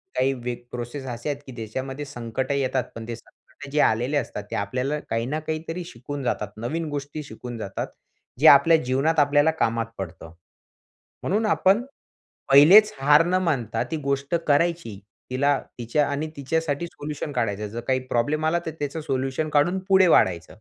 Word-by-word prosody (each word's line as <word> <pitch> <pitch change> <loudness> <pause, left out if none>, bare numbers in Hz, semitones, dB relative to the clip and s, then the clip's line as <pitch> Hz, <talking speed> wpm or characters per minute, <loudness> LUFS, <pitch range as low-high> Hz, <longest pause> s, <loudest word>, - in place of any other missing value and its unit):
काही 130 +1 +2
व्य 125 -1 -4 0.2
प्रोसेस 125 +3 -6
असे 120 +3 -4
आहेत 145 -1 -3
की - - -8
ज्याच्यामध्ये 130 +5 -5
संकट 130 0 -4
येतात 135 -2 0
पण 115 0 -7
ते 120 - -4
संकट 140 +4 -15
जे 150 - 0
आलेले 125 +6 +2
असतात 105 -7 -3
ते, - - -2
आपल्याला 125 +9 -2
काही 115 +1 -1
ना 150 +5 -2
काहीतरी 160 +3 -4
शिकवून 140 -1 -7
जातात. 105 -4 -1
नवीन 155 +8 -3
गोष्टी 145 +1 -5
शिकवून 120 -1 -8
जातात. 100 -3 -4 0.5
जे 155 - +6
आपल्या 150 +4 +8
जीवनात 135 +6 +1
आपल्याला 145 +2 +4
कामात 115 0 +1
पडतं. 85 -3 -7 0.9
म्हणून 210 +4 +1
आपण 205 +1 +3 0.7
पहिलेचं 185 +10 +8
हार 150 +3 +6
न 180 - 0
मानता 135 - -1
ती 160 - -1
गोष्ट 140 +3 -1
करायची. 150 - +1 0.3
तिला 140 +2 +2 0.2
तिच्या 120 +5 +1
आणि 145 +2 -2
तिच्यासाठी 150 +2 -1
सोल्युशन 150 -2 -6
काढायचं. 105 -5 -1
जर 115 +3 -5
काही 130 0 +2
प्रॉब्लेम 145 +7 0
आला, 165 +2 +2
तर - - -1
त्याचं 145 +2 -3
सोल्युशन 135 +1 -2
काढून 150 +6 +2
पुढे 190 -1 +6
वाढायच. 85 - +3
140 Hz, 165 wpm, -24 LUFS, 120-155 Hz, 0.9 s, आपल्या